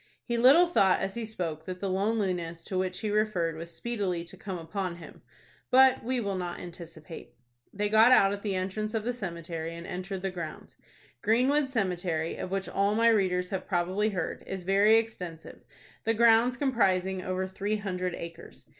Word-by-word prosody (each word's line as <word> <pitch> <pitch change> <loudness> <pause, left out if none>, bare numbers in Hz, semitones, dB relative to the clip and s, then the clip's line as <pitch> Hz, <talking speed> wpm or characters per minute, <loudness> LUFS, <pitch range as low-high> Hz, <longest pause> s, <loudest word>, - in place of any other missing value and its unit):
He 240 - -2
little 265 +9 +7
thought 195 - +3
as 195 0 -2
he 235 +1 -4
spoke 170 -8 -5
that 185 -1 -6
the 200 - -2
loneliness 185 -4 -1
to 190 - -5
which 185 0 -1
he 215 -2 -2
referred 205 -6 0
was 165 +1 -7
speedily 195 -5 -3
to 175 - -12
come 190 -1 -6
upon 175 +2 -4
him. 170 - -13 0.5
But 265 0 +5
we 250 +2 -1
will 200 -4 -2
not 180 -2 -4
anticipate. 165 -2 -10 0.4
They 205 +1 -1
got 220 +3 +6
out 200 -5 +6
at 200 - -5
the 200 -2 -2
entrance 210 +4 -3
of 220 - -1
the 245 +2 -1
cemetery, 170 -5 -5
and 170 0 -8
entered 185 +1 -5
the 195 - -1
grounds. 170 -4 -7 0.5
Greenwood 260 +6 +2
Cemetery, 180 -8 -1
of - - -5
which 195 0 -2
all 200 +1 +1
my 230 +1 +5
readers 180 -4 +1
have 190 - -4
probably 185 +3 0
heard, 190 -4 -4
is 190 -1 -5
very 200 +4 +5
extensive, 180 -8 -3 0.4
the 225 - +1
grounds 235 +2 +5
comprising 190 -9 +1
over 185 0 -2
three 200 +3 -2
hundred 185 -3 -3
acres. 170 0 -10
195 Hz, 180 wpm, -28 LUFS, 180-220 Hz, 0.5 s, little